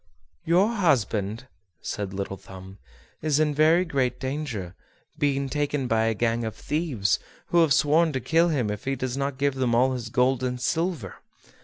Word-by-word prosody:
"Your 180 +6 +4
husband," 115 - 0 0.4
said 100 -2 -4
Little 100 0 -4
Thumb, 95 0 -12 0.4
"is 150 -1 +1
in 155 -1 +2
very 160 +4 +4
great 130 -6 -1
danger, 130 - -4 0.5
being 140 -1 +1
taken 145 -1 -1
by 115 -1 +2
a 115 0 +1
gang 115 +2 0
of 110 -1 -4
thieves, 130 - -1 0.3
who 175 - +4
have 160 -3 +3
sworn 155 +4 +4
to 130 - -1
kill 165 +6 +3
him 125 -10 0
if 105 0 -6
he 135 0 0
does 130 -1 -3
not 140 -1 -2
give 140 0 +1
them 130 -3 0
all 130 +2 +3
his 120 -4 -5
gold 125 +2 +2
and 125 -1 -2
silver. 160 - -2
130 Hz, 175 wpm, -25 LUFS, 115-150 Hz, 0.5 s, Your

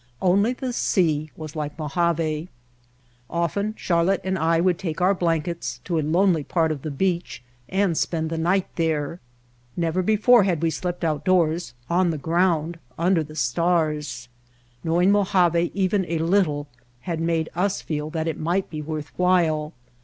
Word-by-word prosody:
Only 200 +6 +3
the 255 -1 -4
sea 155 -9 +1
was 155 -1 -8
like 150 -1 -4
Mojave. 160 +1 -1 0.8
Often 200 +6 -1
Charlotte 175 +2 +1
and 190 0 -1
I 165 -1 +2
would 180 0 +2
take 170 -4 -4
our 185 +2 +4
blankets 170 -2 -2
to 170 -3 -1
a - - +1
lonely 165 +1 +2
part 160 +1 +1
of 145 -3 -4
the 155 - -4
beach 170 -2 -2 0.3
and 190 -3 +1
spend 160 0 -1
the 165 - -2
night 180 +3 +2
there. 160 0 -1 0.6
Never 170 +1 0
before 220 +5 +5
had 175 -5 0
we 165 - +2
slept 175 +1 -4
outdoors, 165 -2 +1
on 180 +1 +2
the 160 - -1
ground 165 +1 0 0.2
under 170 0 +2
the 155 0 -11
stars. 150 -2 0 0.6
Knowing 175 +4 +3
Mojave 180 -4 +3
even 190 0 +1
a 165 - -1
little 160 -4 +1 0.3
had 165 +1 -3
made 165 -1 0
us 190 +3 -1
feel 150 -1 -3
that 160 0 -3
it 160 - -3
might 175 +4 -1
be 155 -2 -4
worth 155 -1 -5
while. 165 -4 +2
170 Hz, 160 wpm, -24 LUFS, 155-185 Hz, 0.8 s, before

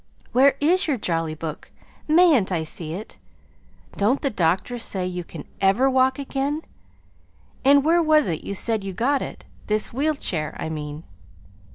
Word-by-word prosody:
Where 270 +2 +5
is 345 +6 +3
your 285 -4 +1
Jolly 165 -6 -2
Book? 155 -1 -7 0.4
Mayn't 310 - +4
I 165 -3 0
see 160 0 -4
it? 210 +4 -9 0.8
Don't 220 +7 +2
the 275 - +1
doctors 190 +6 0
say 185 -2 -2
you 180 -1 -4
can 165 -3 -10 0.2
ever 195 +7 +3
walk 260 0 +3
again? 280 +2 -3 1.0
And 280 +1 +5
where 340 +2 +4
was 310 -2 +4
it 165 -3 -3
you 200 - -4
said 220 +1 0
you 195 -1 -5
got 270 +8 +1
it? - - -7 0.2
this 215 +1 0
wheel 300 +5 0
chair, 155 - -2
I - - -3
mean." 150 0 -6
225 Hz, 165 wpm, -23 LUFS, 175-280 Hz, 1.0 s, Where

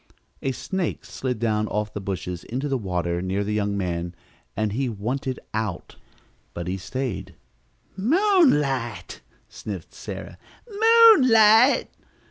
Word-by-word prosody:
A 135 - -1
snake 190 +7 -4
slid 125 -2 -4
down 110 -1 0
off 105 0 -3
the 105 - -5
bushes 90 -2 -5
into 130 +5 -3
the 135 - -1
water 90 -6 -2
near 95 +2 -1
the 105 +1 -3
young 100 -1 -1
man 85 -2 -3 0.4
and 110 0 0
he 130 +4 -1
"wanted 125 +5 -3
out," 110 -4 -4 0.6
but 85 - -4
he 90 - -2
stayed. 120 +4 -5 0.6
"Moonlight!" 195 - +1 0.3
sniffed 95 -6 -8
Sarah. - - -8 0.3
"Moonlight!" 285 - +6
115 Hz, 120 wpm, -24 LUFS, -, 0.6 s, Moonlight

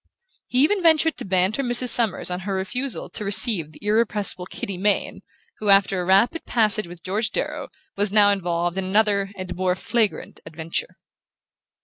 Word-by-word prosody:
He 255 +2 +2
even 390 +6 +1
ventured 320 -1 +3
to - - -6
banter 190 +6 0
Mrs. 245 -1 +4
Summers 225 -7 +4
on 180 - -3
her 195 +1 -4
refusal 250 +8 -3
to 215 - -7
receive 200 - +2
the 155 - -15
irrepressible 210 -4 -1
Kitty 195 - -7
Mayne 200 +3 -2 0.4
who, 210 - -2
after 195 -1 +3
a - - -5
rapid 200 - +2
passage 215 -4 +3
with 170 -1 -13
George 210 +4 -2
Darrow, - - -4 0.3
was 200 0 -1
now 205 -1 +4
involved 175 -2 -2
in 190 - -4
another 200 0 +1
and 185 -1 -7
more 180 0 -1
flagrant 220 +2 -3
adventure. 160 +1 -6
200 Hz, 165 wpm, -22 LUFS, 185-225 Hz, 0.4 s, Mrs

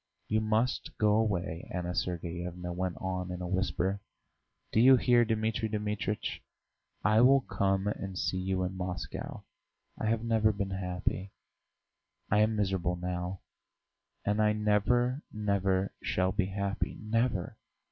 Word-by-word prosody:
"You 110 +1 +1
must 110 +4 0
go 105 -1 +3
away," 90 -7 -1
Anna 90 -1 -2
Sergeyevna 90 0 -3
went 90 0 -2
on 90 -1 -3
in 90 - -4
a 90 - -4
whisper. 95 +1 0 0.7
"Do - - +2
you 130 +3 +8
hear, 120 -1 +5
Dmitri 110 0 0
Dmitritch? 105 0 -2 0.6
I 110 +1 +5
will 135 +2 +6
come 95 -4 0
and 95 -2 -3
see 95 - 0
you 95 0 0
in 90 +1 -2
Moscow. 90 -1 -5 0.6
I 110 - -1
have 115 0 +1
never 110 -2 +3
been 100 -2 -3
happy; 95 +1 -2 1.0
I 105 - +5
am 110 +1 +3
miserable 95 -4 0
now, 90 +1 -4 0.8
and 105 +1 +2
I 105 0 +4
never, 110 +5 +2
never 100 -2 0
shall 95 +1 +1
be 95 0 0
happy, 100 0 -2
never! 110 -3 0
100 Hz, 135 wpm, -31 LUFS, 90-110 Hz, 1.0 s, you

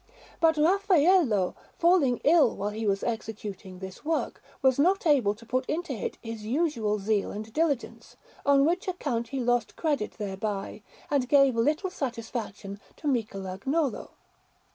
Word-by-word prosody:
But 320 -1 +4
Raffaello, 335 - +3 0.2
falling 335 -8 +3
ill 295 -4 +5
while 205 +1 -3
he 220 +1 -3
was 195 0 0
executing 210 -5 -5
this 190 0 -9
work, 320 +1 -2 0.2
was 265 0 +4
not 370 +6 +3
able 255 -10 +3
to 230 +2 -15
put 255 +3 0
into 330 -2 -2
it 220 - -4
his 225 -2 -6
usual 230 -4 0
zeal 205 0 0
and 215 +1 -7
diligence, 310 -6 -2 0.3
on 280 0 +4
which 350 +4 0
account 270 -10 -2
he 270 +3 -4
lost 245 -2 0
credit 290 -9 -1
thereby, 200 -1 -4 0.3
and 265 -4 +1
gave 275 -3 +5
little 305 - +1
satisfaction 230 - -5 0.2
to - - -13
Michelagnolo. 230 - -1
245 Hz, 140 wpm, -27 LUFS, 210-305 Hz, 0.3 s, ill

